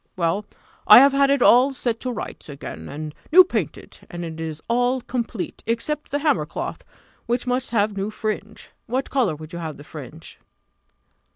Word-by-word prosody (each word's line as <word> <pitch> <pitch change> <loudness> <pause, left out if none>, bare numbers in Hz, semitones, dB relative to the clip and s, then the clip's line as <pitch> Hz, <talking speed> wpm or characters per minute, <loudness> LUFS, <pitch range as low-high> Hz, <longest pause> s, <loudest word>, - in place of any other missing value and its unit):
Well, 180 +4 0 0.4
I 210 - +11
have 275 +3 +8
had 275 0 +4
it 280 -3 +3
all 255 +3 +6
set 240 -3 -2
to 255 - -3
rights 235 - -7
again, 80 - -8
and 150 +1 -6 0.2
new 370 +3 +10
painted, 215 - -4
and 175 0 -6
it 160 -1 -7
is 160 -1 -5
all 245 +2 +1
complete, 235 -5 -4
except 285 +6 -2
the 285 - 0
hammer 295 +1 +1
cloth, - - -5 0.4
which 240 +1 0
must 250 0 -1
have 210 -2 +1
new 200 +1 -2
fringe. 215 0 -5 0.2
What 260 +3 -2
colour 235 - +1
will 155 0 -10
you 170 - -5
have 160 -3 -5
the 145 - -11
fringe?" 155 +1 -11
220 Hz, 180 wpm, -23 LUFS, 165-255 Hz, 0.4 s, I